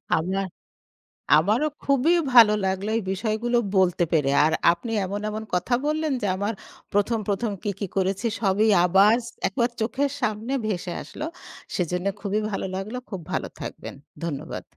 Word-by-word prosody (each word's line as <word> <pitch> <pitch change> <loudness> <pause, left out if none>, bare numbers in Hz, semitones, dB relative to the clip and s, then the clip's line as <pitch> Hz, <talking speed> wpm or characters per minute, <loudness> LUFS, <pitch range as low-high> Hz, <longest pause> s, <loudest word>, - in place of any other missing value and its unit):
আমার 190 +4 -1 0.9
আমারও 215 - +2 0.2
খুবই 280 +5 +3 0.2
ভালো 225 -3 +9
লাগলো 190 +2 -1
এই 225 - 0
বিষয়গুলো 225 +4 0 0.2
বলতে 180 -2 +3
পেরে 145 -4 +3
আর 160 - +3 0.2
আপনি 175 +7 -6
এমন, 200 +2 -3
এমন 215 +1 -5
কথা 185 +8 +1
বললেন 310 -1 0
যে, - - +1
আমার 205 +3 -2 0.4
১ম, 205 +3 +2
১ম 205 +2 0
কী, 205 - -1
কী 200 - -1
করেছি 195 +4 0
সবই 210 +1 +2 0.2
আবার 195 +5 +5 0.3
১ - - -2
বার 235 +1 +3
চোখের 270 +5 0
সামনে 220 +2 -2
ভেসে 180 -4 -2
আসলো, 305 - -7 0.5
সেজন্য 180 +1 -1
খুবই 205 +1 -1
ভালো 195 - -2
লাগলো। 210 +6 -4
খুব 190 -3 -4
ভালো - - -1
থাকবেন - - -7 0.3
ধন্যবাদ। 145 -5 -4
205 Hz, 155 wpm, -25 LUFS, 190-235 Hz, 0.9 s, ভালো